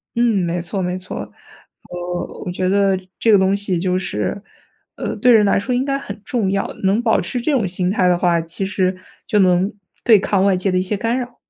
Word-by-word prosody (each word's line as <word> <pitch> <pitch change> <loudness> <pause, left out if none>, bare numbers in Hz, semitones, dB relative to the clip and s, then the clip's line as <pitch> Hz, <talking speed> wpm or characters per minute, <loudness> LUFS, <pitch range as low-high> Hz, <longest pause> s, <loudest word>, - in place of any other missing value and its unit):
嗯， 230 -5 +2
没 170 +1 -2
错 180 +3 -4
没 180 0 -2
错。 185 0 -6 0.7
呃， 175 0 -4 0.2
我 180 - -3
觉 185 +1 -1
得 195 0 +2 0.2
这 225 - +3
个 205 - +7
东 190 +1 +2
西 200 -3 -1
就 185 +1 0
是， 145 - -3 0.5
呃， - - -4
对 250 - +4
人 215 -3 +6
来 200 - +3
说 250 +5 -2
应 255 +2 0
该 275 -1 0
很 205 -7 -8
重 210 -4 -1
要。 195 0 0 0.2
能 195 +4 +2
保 225 -2 +2
持 180 +8 -3
这 275 +6 -1
种 245 -9 +1
心 180 0 -1
态 185 -3 +2
的 180 - +3
话， 175 -2 +2
其 165 +4 -4
实 190 -1 0 0.3
就 210 - +2
能 185 +1 +3 0.3
对 225 -4 +6
抗 190 0 +1
外 195 -2 +3
界 185 +1 0
的 185 - +1
一 - - +1
些 195 +2 -2
干 230 +4 -1
扰。 245 -1 -6
195 Hz, 245 characters per minute, -19 LUFS, 180-215 Hz, 0.7 s, 个